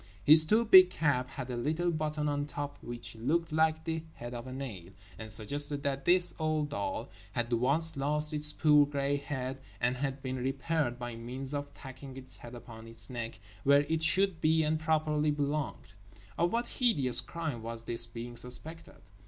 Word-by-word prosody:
His 155 +1 +9
too 220 +7 +2
big 185 -4 +8
cap 140 -7 -1
had 130 -2 -7
a - - -3
little 160 +8 -1
button 155 -1 -2
on 145 0 -2
top 145 -1 -6
which 120 -1 -5
looked 155 +9 -1
like 160 0 +1
the 160 -1 -3
head 120 +1 -8
of 120 +1 -7
a - - -8
nail; 115 -10 -7 0.3
and 110 -1 -4
suggested 145 +7 0
that 140 -1 -3
this 180 0 +4
old 155 -2 -1
doll 285 - -4 0.2
had 120 0 -1
once 140 +8 +4
lost 150 +2 +3
its 150 0 +6
poor 150 -1 +4
grey 140 0 -1
head 135 -2 -5 0.2
and 125 +1 0
had 135 +1 -4
been 130 0 -4
repaired 135 +1 -2
by 120 -1 -6
means 130 +4 -6
of 145 0 -4
tacking 130 0 -11
its 130 0 -4
head 120 +1 -11
upon 115 -1 -12
its 115 -1 -4
neck, 115 -2 -6 0.2
where 140 +1 +5
it 160 +2 -2
should 170 +2 +3
be 160 0 +3
and 155 +1 0
properly 155 -1 0
belonged. 145 -4 -3 0.4
Of 170 +1 0
what 235 +1 -1
hideous 150 - +2
crime 160 -8 -5
was 115 0 -6
this 115 0 +1
being 120 +1 -8
suspected? 155 - -5
145 Hz, 185 wpm, -30 LUFS, 125-155 Hz, 0.4 s, His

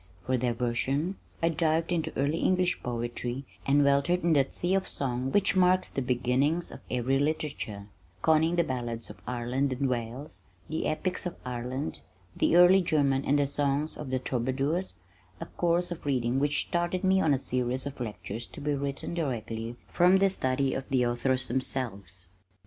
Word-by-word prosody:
For 130 - +1
diversion 125 +8 -1 0.3
I 165 - +4
dived 165 0 +1
into 165 -3 0
early 145 +4 +1
English 185 -1 +1
poetry 120 +2 -3 0.2
and 145 +1 +5
weltered 140 +6 +2
in 170 -1 +3
that 140 -3 +2
sea 175 +2 -1
of 195 -1 +1
song 130 -1 -2
which 200 +2 +3
marks 185 0 +3
the 135 - -2
beginnings 130 +7 +1
of - - -9
every 130 +2 +1
literature, 145 -9 -2 0.4
conning 160 +2 +4
the 170 - +3
ballads 120 -5 -4
of - - -15
Ireland 125 +3 -1
and 135 +2 0
Wales, 125 +3 -4 0.3
the 160 - -2
epics 180 +3 -1
of 175 - -7
Ireland, 125 +3 -4 0.4
the - - +2
early 180 +2 +7
German 140 -5 +2
and 145 - +3
the 145 - +3
songs 145 +2 0
of 150 - -7
the 130 - 0
troubadours, 135 +8 -1 0.4
a - - -5
course 175 +1 0
of 175 - -6
reading 130 -2 0
which 145 +1 +2
started 175 +2 -1
me 190 0 +4
on 160 - +3
a 140 - +4
series 125 0 -1
of 140 -1 -6
lectures 110 -1 -5
to - - -11
be 150 0 -1
written 140 +2 -3
directly 115 -7 -3
from 180 +2 +4
a 195 0 +4
study 130 -5 +1
of 135 - -5
the 130 -2 +2
authors 125 +1 +1
themselves. 100 -9 -2
140 Hz, 170 wpm, -28 LUFS, 125-165 Hz, 0.4 s, early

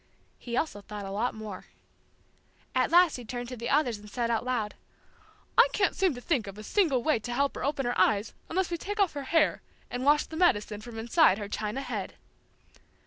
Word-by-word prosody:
He 240 0 -4
also 255 -10 -1
thought 205 0 -7
a 195 - -6
lot 220 +5 -1
more. 215 -3 -7 1.1
At - - +2
last 350 -3 +5
he 245 - -8
turned 245 +1 -5
to 255 - -5
the 235 +1 -4
others 255 -7 +2
and 210 0 -13
said 235 +2 -1
out 230 - 0
loud, 240 -4 -1 0.9
"I - - +9
can't 390 -3 +2
seem 370 -7 +2
to 245 - -8
think 245 - 0
of 195 +1 -8
a 215 - -8
single 280 - +2
way 310 -7 +2
to 240 +3 -6
help 275 +3 +1
her - - -6
open 280 -1 -1
her 245 - 0
eyes 210 0 +2 0.2
unless 365 +1 0
we 340 - -2
take 410 +4 -5
off 395 -4 +3
her 285 -2 -5
hair 325 +1 +2 0.3
and 245 +1 -3
wash 295 +2 +4
the 320 - -9
medicine 210 - +2
from 230 0 -9
inside 235 - +4
her 205 -2 -5
china 215 +5 -3
head." - - -5
245 Hz, 215 wpm, -28 LUFS, 215-310 Hz, 1.1 s, I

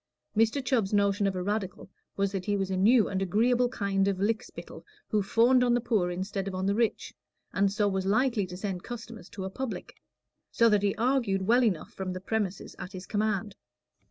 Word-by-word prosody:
Mr. 225 +5 +2
Chubb's 225 -6 +1
notion 200 0 +2
of 195 - -1
a 180 - -2
Radical 200 -2 -3 0.3
was 200 -1 +1
that 190 -2 -4
he 205 -1 +1
was 195 -1 -2
a - - 0
new 215 +5 +4
and 190 -1 -2
agreeable 240 +6 +2
kind 200 -4 0
of 195 -2 0
lick 215 +3 +1
spittle - - -11 0.3
who 215 - +2
fawned 240 +5 +4
on 240 -1 +3
the - - +2
poor 220 -7 +1
instead 190 +2 -3
of 190 - -4
on 185 +1 -2
the 200 - +2
rich, 230 +1 -1 0.4
and 195 0 +2
so 205 0 +1
was 190 -1 -1
likely 220 -1 +2
to 180 0 -8
send 190 -2 -4
customers 230 -4 -8
to 190 -2 -6
a - - -3
"public"; 260 +3 -5 0.6
so 230 0 +4
that 210 -2 +3
he 200 -1 +1
argued 230 -6 +1
well 240 +6 +4
enough 195 -9 -1
from 190 -1 -4
the 185 - -5
premises 200 -1 -3
at 185 - -7
his 185 0 -7
command. 210 -1 -1
205 Hz, 215 wpm, -28 LUFS, 190-230 Hz, 0.6 s, new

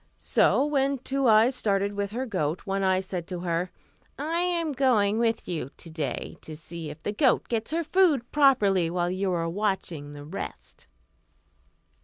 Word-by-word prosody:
So 280 - +3
when 275 -2 +1
Two 270 +1 -1
Eyes 225 +3 +5
started 200 -3 0
with 200 0 -2
her 245 +5 -3
goat, 180 - -2
One 195 0 -1
Eye 190 -1 +2
said 180 -3 -5
to 180 -2 -5
her, 175 0 -1 0.5
"I 320 +4 -1
am 345 -3 0
going 230 -6 +2
with 230 -1 0
you 160 -7 -3
to 165 - -8
day 150 -6 -4
to 155 - -7
see 165 0 -8
if 150 +2 -11
the - - -1
goat 255 +2 +2
gets 225 -1 -2
her 330 +3 0
food 315 -8 +2
properly 210 - +4
while 175 0 -1
you 190 +1 -1
are 165 -2 0
watching 175 -6 -2
the 145 0 -9
rest." 150 - -8
200 Hz, 175 wpm, -27 LUFS, 175-265 Hz, 0.5 s, Eyes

